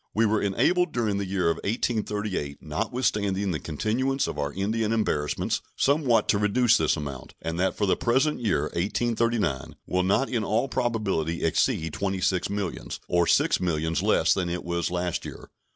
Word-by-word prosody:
We 115 +2 +4
were 110 0 +2
enabled 175 - +2
during 110 -4 0
the 100 - -3
year 95 -1 -1
1838, 105 -9 -2
notwithstanding 100 -6 -1
the 80 - -2
continuance 125 - -1
of - - -4
our 70 0 -1
Indian 105 +5 -1
embarrassments, 75 -10 0
somewhat 135 -6 +2
to 100 - +3
reduce 110 +3 +3
this 80 0 +2
amount, 70 -4 -7
and 80 +1 -4
that 95 +1 0
for 105 - +1
the 95 - +3
present 135 +6 +1
year 100 -11 +1
(1839) 110 - 0
will 90 - 0
not 100 +9 +2
in 115 -3 -1
all 110 +6 +1
probability 105 - -1
exceed 80 0 +1
twenty 95 -1 -2
six 90 0 0
millions, 100 -3 -4
or 85 -1 +2
six - - +3
millions 80 -2 0
less - - +3
than 90 -2 -1
it 90 +1 -3
was 85 -1 -1
last 90 -1 -2
year. - - -9
100 Hz, 170 wpm, -26 LUFS, 85-115 Hz, -, We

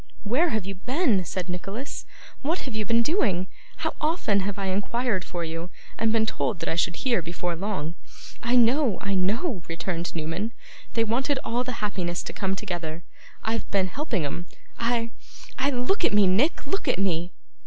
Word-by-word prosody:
'Where 260 +12 +3
have 220 -8 0
you 195 - -3
been?' 245 - +2
said 180 +3 -3
Nicholas. 195 +9 -4 0.3
'What 320 +6 0
have 255 -5 -5
you 215 -1 0
been 230 +1 +4
doing? 220 - +2 0.4
How - - +1
often 305 - +2
have 200 +1 -1
I 200 - -2
inquired 200 +2 +1
for 175 -2 -4
you, 165 +2 -4 0.3
and 225 0 +2
been 220 -1 +4
told 220 -3 0
that - - -4
I - - +2
should 170 +1 +2
hear 240 -8 +2
before 175 +1 -2
long!' 180 -3 -2 0.5
'I 240 +2 +2
know, 245 -2 +5
I 195 -1 -1
know!' 195 - +1
returned 170 +1 -3
Newman. 165 +8 -2 0.4
'They 230 - +4
wanted 260 +5 +1
all 240 +2 0
the 250 -3 -4
happiness 180 -4 -1
to - - -5
come 195 -1 0
together. 175 -5 -4 0.4
I've 225 +1 -1
been 190 -2 +2
helping 230 - -1
'em. 170 +5 -4 0.3
I 230 0 +1 0.5
I 270 +2 +3
look 275 - +1
at - - +4
me, 205 -1 +7
Nick, 210 - +3
look 390 +8 -1
at - - +3
me! 175 -2 +1
205 Hz, 185 wpm, -27 LUFS, 180-245 Hz, 0.5 s, me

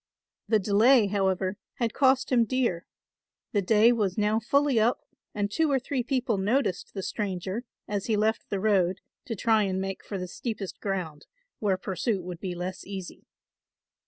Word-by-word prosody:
The 220 - +4
delay, 215 +4 +5
however, 190 -1 0 0.2
had 235 -2 -1
cost 265 -1 +3
him 240 -2 +5
dear; 235 -8 -1 0.6
the 205 - +2
day 220 +4 +5
was 205 -6 0
now 210 +1 +2
fully 275 +2 +2
up 230 +3 +2 0.3
and 205 -1 -1
two 320 +6 +2
or 275 - +4
three 265 +1 -2
people 245 -4 0
noticed 205 -2 0
the 195 - -3
stranger 195 +3 -3 0.2
as 205 -2 -2
he 220 -2 +2
left 220 +2 0
the 200 - -1
road 190 -3 +2 0.2
to 235 -5 -3
try 220 +1 +3
and 190 -2 0
make 195 0 -4
for 200 - -5
the 180 -1 -4
steepest 210 0 -5
ground 180 -7 -4 0.3
where 200 -3 +1
pursuit 190 +1 -2
would 175 -1 -7
be 180 -2 -4
less 180 +1 -5
easy. 190 -2 -8
205 Hz, 170 wpm, -27 LUFS, 190-235 Hz, 0.6 s, delay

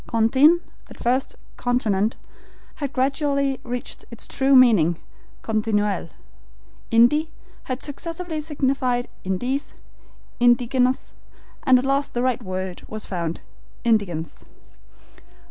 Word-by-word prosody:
CONTIN, 265 +9 +4 0.3
at - - -13
first 255 +3 0 0.2
CONTINENT, 220 -4 +1 0.6
had 285 -3 -3
gradually 275 0 0
reached 245 -1 -5
its 235 - -8
true 270 0 +2
meaning, 205 -11 +6 0.5
continuelle. 210 -5 0 0.8
Indi 250 +7 +4 0.4
had 255 0 -3
successively 330 +2 -4
signified 265 -5 0
indiens, 245 +10 -2 0.7
indigenes, 245 +1 +2 0.5
and 260 -1 +7
at 250 - -1
last 275 0 0
the 240 - 0
right 255 -1 +1
word 185 -2 -5
was 215 0 -6
found 170 -3 -3 0.4
INDIGENCE. 200 -9 0
245 Hz, 100 wpm, -23 LUFS, 215-275 Hz, 0.8 s, and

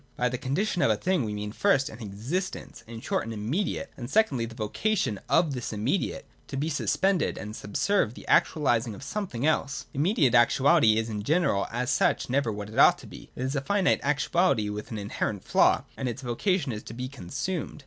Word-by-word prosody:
By 125 - +1
the 125 - -3
Condition 170 +9 -1
of - - +4
a - - +2
thing 185 -5 0
we 105 -2 -3
mean 105 0 -4
first, 135 - +2
an 120 -5 -9
existence, 115 - -4
in 115 0 -8
short - - -1
an 115 - -6
immediate, 115 - -2
and 120 -1 -7
secondly 140 - +2
the 115 - -11
vocation 110 - -1
of 165 -3 +3
this 125 -3 -4
im 105 -1 -5
mediate 140 - -1 0.2
to 135 - -5
be 150 +4 -1
suspended 185 +4 +1
and 105 +1 -6
subserve 115 - 0
the - - -11
actualising 120 -7 +2
of 100 - -11
something 145 - -3
else. 140 -3 0
— - - -34
Immediate 150 - +2
actuality 125 0 +5
is 110 0 0
in 105 -2 -4
general 145 - +1
as 125 +4 -1
such 180 -8 +1
never 135 -3 +1
what 105 0 -6
it - - -3
ought - - +7
to - - -13
be; - - -12
it 125 - -4
is 130 +2 -2
a 140 - 0
finite 195 +6 +2
actuality 145 - +1
with 105 +2 -6
an 110 - -5
inherent 100 -1 -3
flaw, - - +3
and 130 - -2
its 125 +3 -6
vocation 140 - 0
is 105 -2 -5
to 115 - -10
be 125 +1 -4
consumed. 140 - -5
130 Hz, 210 wpm, -27 LUFS, 110-165 Hz, 0.2 s, ought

